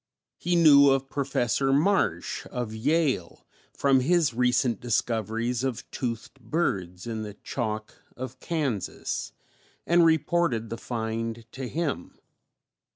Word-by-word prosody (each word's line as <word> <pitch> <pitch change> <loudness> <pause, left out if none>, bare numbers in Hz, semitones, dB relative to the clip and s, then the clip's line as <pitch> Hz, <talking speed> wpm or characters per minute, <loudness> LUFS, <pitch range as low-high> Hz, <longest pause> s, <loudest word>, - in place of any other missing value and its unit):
He 175 +1 0
knew 145 -4 +7
of 135 0 +1
Professor 135 -1 0
Marsh 145 - +1
of 120 -3 -4
Yale 130 - 0 0.3
from 135 -2 +3
his 155 0 +2
recent 125 0 +2
discoveries 115 +1 -1
of 130 -4 -3
toothed 115 -3 -4
birds 95 - -2
in 115 -2 -4
the 105 -2 -7
chalk 110 -2 -4 0.2
of 130 0 -6
Kansas, 140 - -2 0.5
and 170 +1 +5
reported 160 -7 +2
the 115 - -3
find 115 0 -3
to 130 -1 -5
him. 150 - -3
125 Hz, 115 wpm, -27 LUFS, 110-145 Hz, 0.5 s, knew